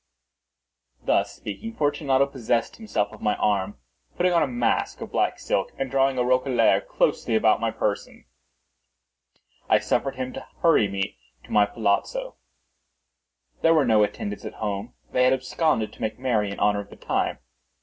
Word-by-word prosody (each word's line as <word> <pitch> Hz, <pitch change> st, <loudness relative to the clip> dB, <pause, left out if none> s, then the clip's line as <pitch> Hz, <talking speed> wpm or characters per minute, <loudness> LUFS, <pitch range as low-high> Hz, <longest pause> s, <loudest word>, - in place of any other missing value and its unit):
Thus -, -, +2 dB
speaking, 225 Hz, -, -7 dB
Fortunato 145 Hz, -2 st, +2 dB
possessed 120 Hz, -4 st, -1 dB
himself 205 Hz, -, -2 dB
of 110 Hz, -, -13 dB
my 105 Hz, -1 st, +1 dB
arm. 100 Hz, -1 st, 0 dB, 0.4 s
Putting 180 Hz, 0 st, +2 dB
on 170 Hz, -, +4 dB
a -, -, +2 dB
mask 120 Hz, -2 st, 0 dB
of -, -, -7 dB
black -, -, +1 dB
silk, 95 Hz, -, -1 dB
and 135 Hz, -1 st, -3 dB
drawing 135 Hz, -1 st, +2 dB
a 125 Hz, -, +2 dB
roquelaire 130 Hz, 0 st, +3 dB
closely 115 Hz, -, 0 dB
about 110 Hz, 0 st, +4 dB
my 115 Hz, 0 st, 0 dB
person, 105 Hz, -2 st, -3 dB, 1.4 s
I -, -, +6 dB
suffered 135 Hz, -, -1 dB
him 130 Hz, 0 st, -4 dB
to -, -, -8 dB, 0.2 s
hurry 165 Hz, -11 st, +5 dB
me 95 Hz, -9 st, -3 dB, 0.2 s
to -, -, -15 dB
my 105 Hz, -1 st, +4 dB
palazzo. 120 Hz, -, -1 dB, 1.3 s
There 165 Hz, 0 st, +5 dB
were 150 Hz, -3 st, +4 dB
no 110 Hz, -3 st, +4 dB
attendants 105 Hz, 0 st, -4 dB
at -, -, -7 dB
home; 105 Hz, 0 st, -4 dB, 0.2 s
they 125 Hz, -, +3 dB
had 130 Hz, +1 st, +5 dB
absconded 130 Hz, -2 st, 0 dB
to -, -, -15 dB
make 110 Hz, -, -2 dB
merry 115 Hz, -6 st, 0 dB
in 100 Hz, -, -6 dB
honor 105 Hz, 0 st, +2 dB
of 100 Hz, -, -8 dB
the -, -, -12 dB
time. -, -, -1 dB
120 Hz, 165 wpm, -25 LUFS, 105-135 Hz, 1.4 s, I